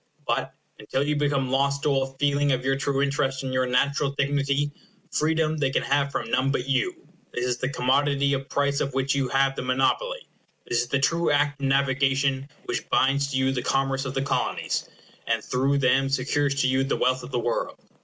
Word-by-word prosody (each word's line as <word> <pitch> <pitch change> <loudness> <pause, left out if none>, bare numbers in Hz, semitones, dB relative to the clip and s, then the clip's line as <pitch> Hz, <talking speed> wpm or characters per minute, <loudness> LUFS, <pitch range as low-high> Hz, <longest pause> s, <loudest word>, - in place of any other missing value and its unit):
But, - - -1 0.2
until 120 +6 -1
you 150 +1 0
become 140 -3 0
lost 140 +1 +1
to - - +2
all 135 -1 0
feeling 145 0 +2
of 130 0 -1
your 135 0 +2
true 140 0 0
interest 140 -1 -1
and 130 -1 -3
your 130 0 +1
natural 140 +3 +1
dignity, 140 +1 0 0.4
freedom 155 0 +1
they 140 -3 +1
can - - 0
have 140 0 +1
from - - -4
none 130 +1 +2
but 135 -2 -1
you. 340 - -1 0.3
This 125 - -1
is 125 -1 0
the 130 - -1
commodity 140 +2 +1
of 135 0 -3
price 140 0 +1
of 135 -2 -2
which 135 +1 +1
you 140 -2 0
have 135 0 +2
the - - -3
monopoly. 305 - 0 0.4
This 120 - +1
is 120 - -3
the 140 - +1
true 165 +5 +1
Act 145 -1 +1
of 135 - +1
Navigation 135 0 +1 0.2
which - - -3
binds 140 +1 +2
to 135 - -1
you 130 0 +2
the 130 -2 -2
commerce 135 +1 0
of 130 0 -4
the 135 - 0
Colonies, 140 -1 -1 0.4
and - - 0
through 135 +3 +1
them 135 0 +2
secures 140 +1 0
to 130 - +2
you 130 +1 +2
the 135 - -1
wealth 130 +1 +1
of 125 - -9
the 130 - -2
world. 120 0 -2
135 Hz, 210 wpm, -25 LUFS, 130-140 Hz, 0.4 s, to